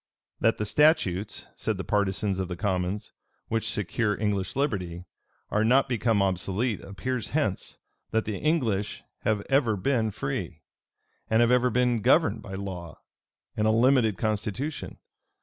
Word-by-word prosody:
That 115 Hz, -, +3 dB
the 105 Hz, -, -1 dB
statutes, 105 Hz, -, +2 dB
said -, -, -2 dB
the -, -, -4 dB
partisans 100 Hz, -1 st, 0 dB
of 95 Hz, -, -1 dB
the 90 Hz, -, -4 dB
commons, 95 Hz, +1 st, -2 dB, 0.4 s
which 115 Hz, -1 st, 0 dB
secure 105 Hz, +1 st, -1 dB
English 100 Hz, -3 st, -1 dB
liberty, 90 Hz, -, -2 dB, 0.5 s
are 105 Hz, -, +2 dB
not 130 Hz, +5 st, +4 dB
become 115 Hz, -4 st, +2 dB
obsolete, 95 Hz, +4 st, -1 dB
appears 125 Hz, +5 st, -4 dB
hence, 110 Hz, -12 st, -1 dB, 0.3 s
that 110 Hz, 0 st, 0 dB
the 105 Hz, -2 st, -3 dB
English 115 Hz, -10 st, 0 dB, 0.2 s
have 105 Hz, -2 st, 0 dB
ever 135 Hz, -6 st, +3 dB
been 115 Hz, +1 st, +1 dB
free, 100 Hz, -, -4 dB, 0.7 s
and 110 Hz, -, +3 dB
have 120 Hz, 0 st, +4 dB
ever 125 Hz, 0 st, +4 dB
been 125 Hz, -1 st, +2 dB
governed 155 Hz, +8 st, +3 dB
by 95 Hz, -, -7 dB
law 95 Hz, -4 st, -6 dB, 0.6 s
and 110 Hz, 0 st, +1 dB
a -, -, +4 dB
limited 115 Hz, -2 st, +4 dB
constitution. 110 Hz, +7 st, -3 dB
110 Hz, 145 wpm, -27 LUFS, 95-125 Hz, 0.7 s, not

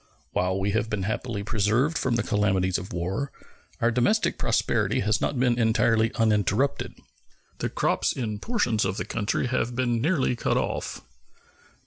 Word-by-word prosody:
While 95 Hz, +1 st, 0 dB
we 100 Hz, +1 st, 0 dB
have 110 Hz, +1 st, 0 dB
been 105 Hz, -3 st, -2 dB
happily 110 Hz, +1 st, -3 dB
preserved 110 Hz, +9 st, +1 dB
from 125 Hz, -4 st, 0 dB
the 115 Hz, -, +1 dB
calamities 95 Hz, -4 st, +1 dB
of 95 Hz, -, -9 dB
war, 95 Hz, +11 st, -2 dB, 0.5 s
our 120 Hz, -, +2 dB
domestic 125 Hz, -, +1 dB
prosperity -, -, +1 dB
has 105 Hz, +1 st, +1 dB
not 135 Hz, -, -1 dB
been 125 Hz, -1 st, +2 dB
entirely 115 Hz, 0 st, +3 dB
uninterrupted. 110 Hz, +4 st, +1 dB, 0.6 s
The -, -, -1 dB
crops -, -, +1 dB
in 110 Hz, -5 st, -3 dB
portions 125 Hz, -, 0 dB
of 95 Hz, 0 st, -1 dB
the -, -, -3 dB
country 110 Hz, +3 st, -1 dB
have 125 Hz, -1 st, -1 dB
been 120 Hz, -2 st, 0 dB
nearly 145 Hz, -4 st, +1 dB
cut -, -, 0 dB
off. -, -, -3 dB
110 Hz, 155 wpm, -26 LUFS, 100-125 Hz, 0.6 s, entirely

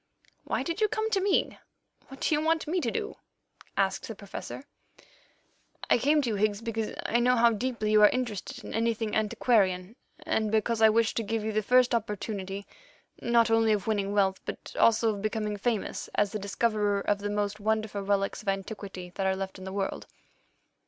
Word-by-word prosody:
"Why -, -, -1 dB
did 335 Hz, +5 st, -3 dB
you 430 Hz, -, +5 dB
come 435 Hz, +1 st, -2 dB
to 390 Hz, -, +2 dB
me? 395 Hz, 0 st, +1 dB, 0.5 s
What 270 Hz, 0 st, -12 dB
do -, -, +1 dB
you 300 Hz, -, +2 dB
want 320 Hz, 0 st, +1 dB
me 355 Hz, +4 st, 0 dB
to -, -, 0 dB
do?" 445 Hz, -1 st, -4 dB, 0.6 s
asked 195 Hz, -1 st, 0 dB
the 225 Hz, -, -6 dB
Professor. 200 Hz, +5 st, -8 dB, 1.3 s
"I -, -, +6 dB
came 295 Hz, +4 st, +3 dB
to 245 Hz, -, -1 dB
you, -, -, -1 dB
Higgs, 205 Hz, 0 st, +1 dB
because 225 Hz, -1 st, -3 dB
I 235 Hz, -, +2 dB
know 250 Hz, +1 st, +4 dB
how 235 Hz, 0 st, +5 dB
deeply 225 Hz, -1 st, -2 dB
you 215 Hz, 0 st, +6 dB
are 210 Hz, -, +9 dB
interested 235 Hz, -6 st, -4 dB
in -, -, -7 dB
anything 225 Hz, -1 st, 0 dB
antiquarian, 210 Hz, -3 st, +1 dB, 0.3 s
and 220 Hz, -9 st, 0 dB
because 220 Hz, +1 st, +1 dB
I 220 Hz, -, +8 dB
wished 225 Hz, +1 st, +2 dB
to 230 Hz, -, +1 dB
give 225 Hz, +1 st, -2 dB
you 220 Hz, -, -1 dB
the 215 Hz, 0 st, +1 dB
first 250 Hz, +3 st, +4 dB
opportunity, 205 Hz, -3 st, -3 dB, 0.6 s
not 235 Hz, -1 st, +3 dB
only 225 Hz, -1 st, +4 dB
of 205 Hz, -3 st, -1 dB
winning 205 Hz, -2 st, 0 dB
wealth, 195 Hz, -2 st, +1 dB
but -, -, -7 dB
also 225 Hz, -1 st, +4 dB
of 200 Hz, -, -6 dB
becoming 215 Hz, 0 st, -2 dB
famous 215 Hz, 0 st, -2 dB
as 205 Hz, -1 st, +2 dB
the 215 Hz, -, -3 dB
discoverer 205 Hz, 0 st, 0 dB
of 205 Hz, 0 st, 0 dB
the 205 Hz, 0 st, -3 dB
most 205 Hz, 0 st, -2 dB
wonderful 215 Hz, -1 st, -1 dB
relics 195 Hz, 0 st, 0 dB
of 215 Hz, -, -18 dB
antiquity 195 Hz, -2 st, -5 dB
that 190 Hz, +1 st, -1 dB
are 190 Hz, -, +2 dB
left 190 Hz, 0 st, -5 dB
in 185 Hz, -, -9 dB
the 190 Hz, -, -5 dB
world." 195 Hz, 0 st, -3 dB
215 Hz, 195 wpm, -28 LUFS, 200-235 Hz, 1.3 s, are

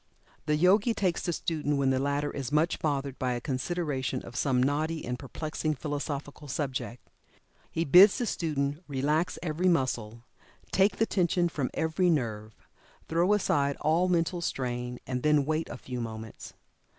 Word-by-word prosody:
The 150 Hz, -, +3 dB
Yogi 200 Hz, +8 st, +4 dB
takes 185 Hz, -5 st, 0 dB
the 175 Hz, -, -1 dB
student 150 Hz, -3 st, -1 dB
when 135 Hz, -1 st, +2 dB
the 130 Hz, -, +1 dB
latter 140 Hz, +1 st, 0 dB
is 135 Hz, -2 st, -5 dB
much 155 Hz, +3 st, +2 dB
bothered 140 Hz, -3 st, -2 dB
by 125 Hz, -1 st, 0 dB
a 120 Hz, -, -2 dB
consideration 135 Hz, +1 st, -2 dB
of 120 Hz, -, -10 dB
some 125 Hz, -1 st, +2 dB
knotty 155 Hz, +4 st, -1 dB
and 125 Hz, 0 st, -3 dB
perplexing 155 Hz, +2 st, -3 dB
philosophical 145 Hz, +1 st, -5 dB
subject. 130 Hz, -4 st, -4 dB, 0.6 s
He 165 Hz, -, -1 dB
bids 185 Hz, +7 st, +8 dB
the 245 Hz, -, -1 dB
student 145 Hz, -6 st, -1 dB
relax 150 Hz, +3 st, 0 dB
every 170 Hz, +2 st, 0 dB
muscle, 120 Hz, -8 st, -1 dB, 0.5 s
take 195 Hz, +2 st, +3 dB
the 225 Hz, -, +3 dB
tension 175 Hz, -3 st, +1 dB
from 140 Hz, -6 st, -2 dB
every 160 Hz, +3 st, +1 dB
nerve 110 Hz, -8 st, -1 dB, 0.5 s
throw 170 Hz, +4 st, +2 dB
aside 140 Hz, -8 st, +1 dB
all 165 Hz, +4 st, +2 dB
mental 175 Hz, 0 st, +1 dB
strain, 125 Hz, -4 st, -3 dB
and 125 Hz, -1 st, -3 dB
then 150 Hz, -1 st, +3 dB
wait 155 Hz, +2 st, -1 dB
a -, -, -6 dB
few 125 Hz, -1 st, -6 dB
moments. 110 Hz, -1 st, -7 dB
145 Hz, 160 wpm, -29 LUFS, 130-165 Hz, 0.6 s, bids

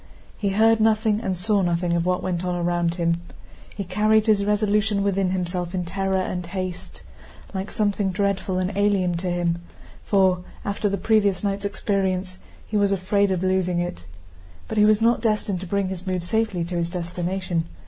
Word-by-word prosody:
He 200 Hz, -, -1 dB
heard 220 Hz, +3 st, +4 dB
nothing 220 Hz, 0 st, +2 dB
and 190 Hz, -4 st, -2 dB
saw 205 Hz, +3 st, +1 dB
nothing 175 Hz, -1 st, 0 dB
of 170 Hz, 0 st, 0 dB
what 180 Hz, 0 st, 0 dB
went 180 Hz, -1 st, -2 dB
on 180 Hz, -1 st, -1 dB
around 175 Hz, -1 st, 0 dB
him. 170 Hz, -1 st, 0 dB, 0.5 s
He 200 Hz, -, -5 dB
carried 210 Hz, +4 st, +2 dB
his 210 Hz, -3 st, +3 dB
resolution 210 Hz, 0 st, +1 dB
within 195 Hz, -1 st, +1 dB
himself 180 Hz, -1 st, -2 dB
in 180 Hz, -1 st, -1 dB
terror 190 Hz, +2 st, -1 dB
and 185 Hz, -1 st, -2 dB
haste, 185 Hz, 0 st, -6 dB, 0.5 s
like 190 Hz, +1 st, -3 dB
something 205 Hz, -2 st, 0 dB
dreadful 195 Hz, -1 st, -1 dB
and 185 Hz, +2 st, -1 dB
alien 200 Hz, -3 st, +2 dB
to 180 Hz, +1 st, -2 dB
him, 175 Hz, -1 st, 0 dB, 0.4 s
for, 190 Hz, -3 st, +3 dB, 0.3 s
after 205 Hz, +1 st, -1 dB
the 200 Hz, -, -1 dB
previous 200 Hz, -1 st, +2 dB
night's 200 Hz, 0 st, -1 dB
experience, 190 Hz, -2 st, -1 dB, 0.3 s
he 215 Hz, -, -2 dB
was 200 Hz, -1 st, +3 dB
afraid 200 Hz, +1 st, +2 dB
of 185 Hz, -1 st, -1 dB
losing 185 Hz, -1 st, +1 dB
it. 175 Hz, -, -3 dB, 0.6 s
But -, -, -1 dB
he 210 Hz, -, +6 dB
was 215 Hz, 0 st, +4 dB
not 230 Hz, 0 st, +3 dB
destined 210 Hz, -4 st, 0 dB
to 190 Hz, -, -7 dB
bring 200 Hz, 0 st, 0 dB
his 190 Hz, 0 st, -6 dB
mood 185 Hz, -2 st, -1 dB
safely 215 Hz, -1 st, 0 dB
to 175 Hz, +1 st, -3 dB
his 170 Hz, 0 st, -1 dB
destination. 175 Hz, 0 st, -2 dB
190 Hz, 180 wpm, -23 LUFS, 180-205 Hz, 0.6 s, he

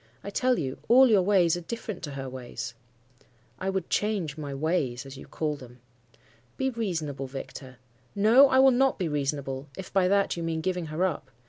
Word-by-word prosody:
I 200 Hz, -, -6 dB
tell 255 Hz, +3 st, +2 dB
you, 135 Hz, -3 st, -3 dB
all 260 Hz, +3 st, +7 dB
your 210 Hz, -4 st, +5 dB
ways 180 Hz, -3 st, +3 dB
are 175 Hz, -, -5 dB
different 215 Hz, +1 st, -6 dB
to 145 Hz, -, -7 dB
her 135 Hz, -1 st, -5 dB
ways.' 125 Hz, -2 st, -6 dB, 0.9 s
"'I 190 Hz, -, -2 dB
would 190 Hz, -3 st, -2 dB
change 200 Hz, -9 st, 0 dB
my 150 Hz, -3 st, -6 dB
"ways," 140 Hz, -3 st, -1 dB
as 135 Hz, 0 st, -9 dB
you 135 Hz, -, -11 dB
call 150 Hz, -2 st, -2 dB
them.' 125 Hz, -3 st, -13 dB, 0.8 s
"'Be 265 Hz, 0 st, 0 dB
reasonable, 160 Hz, -, -3 dB
Victor.' 130 Hz, -1 st, -8 dB, 0.4 s
"'No, 230 Hz, +7 st, +6 dB
I 260 Hz, -, +3 dB
will 265 Hz, 0 st, +7 dB
not 265 Hz, +2 st, +2 dB
be 180 Hz, -, -1 dB
reasonable, 140 Hz, -2 st, -2 dB
if 190 Hz, -, -8 dB
by 185 Hz, -1 st, +3 dB
that 200 Hz, +1 st, +2 dB
you 170 Hz, -, -5 dB
mean 165 Hz, -1 st, -2 dB
giving 180 Hz, -1 st, -2 dB
her 155 Hz, +4 st, 0 dB
up. 150 Hz, -7 st, -3 dB
165 Hz, 195 wpm, -27 LUFS, 140-200 Hz, 0.9 s, all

